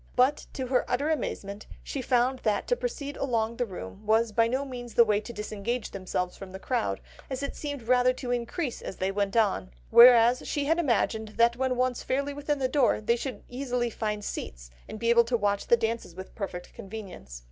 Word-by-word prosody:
But 260 +4 +2
to 265 - -3
her 255 0 +2
utter 285 +5 +1
amazement 205 -9 -4 0.2
she 275 - -4
found 255 +1 +2
that 210 -2 0
to - - +4
proceed 315 - -4
along 230 -3 -1
the 245 - -1
room 180 - -8
was 220 +1 +3
by 230 +1 +3
no 260 +4 -1
means 245 -3 -8
the 235 - +8
way 210 -1 +2
to 235 - -8
disengage 215 +2 -4
themselves 180 -1 -3
from 190 -1 -10
the - - -5
crowd; 100 - -1 0.3
it 275 +1 -4
seemed 285 -4 -5
rather 250 +2 +4
to 250 -1 -5
increase 245 +3 -2
as - - -6
they 190 +1 0
went 200 +2 -1
on; 200 - +2 0.2
whereas 240 0 +7
she 290 -1 -1
had 325 +3 +2
imagined 220 -6 0
that 235 +1 +4
when 260 0 0
once 250 0 0
fairly 280 +2 -1
within 290 +1 -2
the 265 -2 0
door, 260 -2 +2
they 225 +2 +2
should 240 -3 -5
easily 245 -2 -2
find 210 -2 -3
seats, - - -6 0.2
and 215 - -6
be 230 +2 +1
able 235 0 +6
to 240 +1 0
watch 205 -2 0
the 235 - +5
dances 225 -6 -3
with 190 +1 -9
perfect 185 -4 -6
convenience. 190 - -9
235 Hz, 205 wpm, -28 LUFS, 210-255 Hz, 0.3 s, the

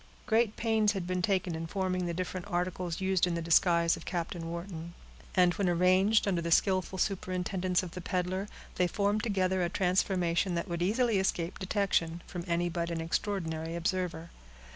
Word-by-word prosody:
Great 225 -2 +2
pains 220 -2 +2
had 190 -3 -3
been 180 0 -1
taken 185 -1 0
in 165 0 -4
forming 185 -1 -1
the 170 - -2
different 185 0 -4
articles 180 -2 -2
used 190 -1 +2
in 175 - -1
the - - -1
disguise 170 0 +4
of 165 - -10
Captain 170 -1 -4
Wharton, 170 -1 -6 0.4
and 180 -1 +5
when 195 -1 0
arranged, 185 +5 +4
under 180 -4 +1
the 170 - -3
skillful 185 +2 +2
superintendence 185 -1 -1
of 180 - -6
the 180 - -7
peddler, 185 +2 -2 0.3
they 180 - +3
formed 205 +3 0
together 190 -4 +1
a 175 - +1
transformation 180 -1 +1
that 170 - -2
would 170 -1 -3
easily 220 +3 +2
escape 180 -2 -1
detection, 185 -4 0
from 175 -2 -6
any 170 0 +1
but 170 0 -2
an 170 -1 -2
extraordinary 165 -2 -2
observer. 170 -1 -2
180 Hz, 175 wpm, -30 LUFS, 170-190 Hz, 0.4 s, and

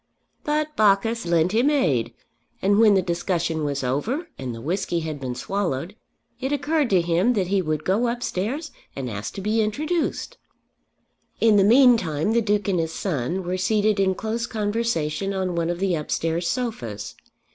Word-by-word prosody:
But 305 -1 -1
Bacchus 215 +1 +2
lent 170 +1 +2
him 235 +7 +3
aid, 160 - +1 0.5
and 200 +2 +3
when 215 -3 +6
the 190 - +3
discussion 170 -2 -1
was 140 -2 -2
over 225 - -2
and 130 -2 -5
the - - -8
whisky 170 - -1
had 155 -2 -5
been 130 -2 -4
swallowed, 185 0 -3 0.4
it 265 +1 -2
occurred 290 -1 +1
to 185 -3 +4
him 175 +8 +2
that 190 -5 -1
he 195 -1 +2
would 155 -3 -2
go 210 +6 +1
upstairs 245 - -3 0.2
and 135 -2 -4
ask 105 0 -5
to 195 - -5
be 215 +3 +1
introduced. 310 - -2 1.0
In 225 -2 +5
the 195 - +5
meantime 220 - +4
the 235 +1 +3
Duke 210 -2 0
and 185 -3 +1
his 165 0 -2
son 175 +1 -2
were 180 +1 -2
seated 210 +2 +1
in 190 -1 +2
close 230 +3 -3
conversation 205 -5 -1
on 185 -1 -1
one 170 -1 -1
of 175 - -1
the 190 0 0
upstairs 165 +2 -1
sofas. 120 - -4
195 Hz, 170 wpm, -23 LUFS, 165-230 Hz, 1.0 s, when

